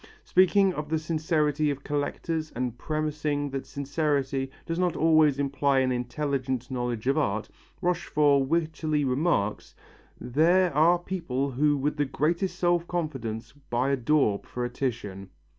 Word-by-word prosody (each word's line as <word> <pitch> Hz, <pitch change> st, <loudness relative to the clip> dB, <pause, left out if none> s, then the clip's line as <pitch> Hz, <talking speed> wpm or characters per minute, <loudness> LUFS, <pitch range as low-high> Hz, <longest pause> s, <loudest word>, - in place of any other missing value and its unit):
Speaking 190 Hz, +1 st, +4 dB
of 150 Hz, -1 st, -5 dB
the 160 Hz, -, +1 dB
sincerity 155 Hz, -2 st, 0 dB
of 140 Hz, -1 st, -4 dB
collectors 155 Hz, +2 st, -2 dB
and 125 Hz, -1 st, -2 dB
premising 150 Hz, 0 st, -2 dB
that 135 Hz, 0 st, -4 dB
sincerity 140 Hz, -2 st, -1 dB, 0.2 s
does 165 Hz, +1 st, -3 dB
not 180 Hz, -2 st, +1 dB
always 155 Hz, -3 st, +4 dB
imply 140 Hz, 0 st, +1 dB
an 130 Hz, -1 st, +1 dB
intelligent 130 Hz, 0 st, -2 dB
knowledge 120 Hz, -3 st, -3 dB
of 135 Hz, +3 st, +2 dB
art, 110 Hz, -6 st, -1 dB, 0.3 s
Rochefort 145 Hz, -6 st, +2 dB
wittily 155 Hz, -2 st, 0 dB
remarks: 130 Hz, -, 0 dB, 0.4 s
"There 170 Hz, +7 st, +3 dB
are 165 Hz, +5 st, +5 dB
people 155 Hz, -7 st, -3 dB
who 145 Hz, +3 st, +2 dB
with 145 Hz, +3 st, -1 dB
the 145 Hz, -, +2 dB
greatest 165 Hz, +7 st, -1 dB
self 175 Hz, -1 st, +1 dB
confidence 125 Hz, -10 st, -4 dB, 0.2 s
buy 125 Hz, +3 st, +1 dB
a -, -, +3 dB
daub 130 Hz, -5 st, +1 dB
for 125 Hz, 0 st, -3 dB
a 120 Hz, -, -4 dB
Titian." 105 Hz, -8 st, -4 dB
145 Hz, 140 wpm, -27 LUFS, 130-155 Hz, 0.4 s, are